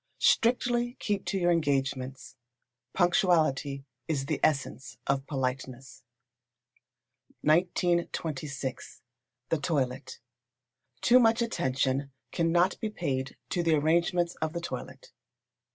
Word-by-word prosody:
Strictly 240 +1 +2
keep 205 -2 -2
to 195 - -1
your 175 -1 +2
engagements. 135 -4 -1 0.6
Punctuality 160 -7 +2 0.2
is 145 -4 -1
the 150 0 -2
essence 140 -2 -1
of 135 0 0
politeness. 130 -1 -4 1.4
1926. 155 -5 -1 0.5
The 165 - +1
Toilet. 130 -5 -2 0.8
Too 250 +1 +6
much 230 0 +4
attention 135 - -1 0.2
cannot 175 +2 +2
be 220 - -2
paid 135 -10 -3
to 175 - +1
the 165 -2 +3
arrangements 170 +3 +2
of 160 0 -2
the 170 - -3
toilet. - - -7
155 Hz, 100 wpm, -29 LUFS, 135-175 Hz, 1.4 s, Too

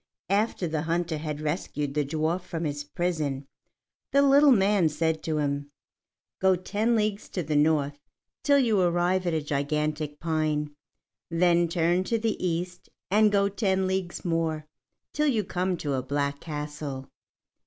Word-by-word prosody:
After 200 -3 +1
the 155 -1 -1
hunter 165 0 -1
had 150 -1 -4
rescued 150 -2 -2
the 150 0 +1
dwarf 155 +5 -1
from 170 -2 -5
his 145 -2 -3
prison, 145 -3 -2 0.7
the 280 0 +5
little 280 +1 +6
man 200 -6 +4
said 160 +1 -1
to 155 -1 0
him: 145 -1 -1 0.7
"Go 190 0 +4
ten 210 +6 0
leagues 210 -2 -1
to 180 - -3
the 150 0 -2
north 145 -1 +2 0.4
till 285 -1 +4
you 225 -7 +3
arrive 175 +1 +1
at 170 - +1
a 155 - -1
gigantic 150 +1 -2
pine; 155 -2 -1 0.6
then 170 0 +3
turn 175 +2 +1
to 230 - +1
the 225 -3 -2
east, 180 +1 -3 0.2
and 210 +1 +5
go 200 -1 +3
ten 190 -2 0
leagues 185 -2 -3
more 165 -2 -1 0.5
till 300 +1 +1
you 230 -7 +2
come 180 0 -1
to 145 -3 -2
a 130 - 0
black 140 +2 -2
castle. 150 -3 -6
165 Hz, 155 wpm, -27 LUFS, 150-190 Hz, 0.7 s, little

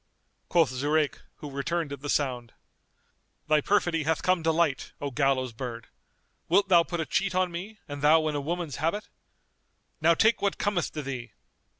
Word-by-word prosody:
Quoth 165 -7 +3
Zurayk, 145 +3 0 0.2
who 145 - -9
returned 145 +2 -2
at 140 - -7
the 145 - -5
sound, 125 -6 -1 0.9
"Thy 155 0 +4
perfidy 175 -4 +1
hath 160 +1 0
come 185 -2 +2
to 160 0 +2
light, 160 -4 0
O 140 -1 -3
gallows 135 -2 +1
bird! 115 -1 -6 0.6
Wilt 195 +3 +3
thou 175 -2 +7
put 175 0 -4
a 160 - -1
cheat 185 +3 0
on 185 -1 +1
me 195 +6 -7
and 145 -1 -6
thou 155 +1 +5
in 155 - -1
a 145 - -1
woman's 165 -2 -3
habit? 165 +7 -2 0.9
Now 165 +2 +5
take 220 +5 +3
what 200 -1 0
cometh 200 -4 -1
to 150 - -4
thee!" 130 -4 -6
155 Hz, 180 wpm, -27 LUFS, 140-175 Hz, 0.9 s, thou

